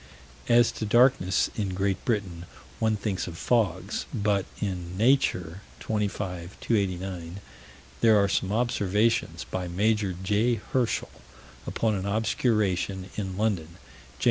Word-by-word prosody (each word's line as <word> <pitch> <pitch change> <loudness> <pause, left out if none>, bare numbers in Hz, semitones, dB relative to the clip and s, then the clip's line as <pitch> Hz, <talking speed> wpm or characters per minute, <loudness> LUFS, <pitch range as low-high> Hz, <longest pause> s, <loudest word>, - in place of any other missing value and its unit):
As 120 0 +5
to 110 - -4
darknesses 120 -5 +3
in 100 -4 -2
Great 95 0 -1
Britain, 95 -7 -2 0.3
one 110 -1 +2
thinks 100 -3 -2
of 85 -2 -7
fogs 115 -3 0
but 100 -2 0
in 90 -3 -4
Nature, 100 -7 +2 0.2
25 100 -4 -3
289, 95 -4 -2 0.6
there 110 -2 +5
are 100 -1 +4
some 95 0 0
observations 110 -1 +1
by 90 -1 -4
Major 100 +2 +1
J. 105 +5 +2
Herschel, 120 +2 -1 0.6
upon 110 -1 0
an 95 -1 -2
obscuration 100 -3 0
in 95 -3 -4
London, 90 -6 -1
Jan. - - -21
100 Hz, 120 wpm, -27 LUFS, 95-110 Hz, 0.6 s, As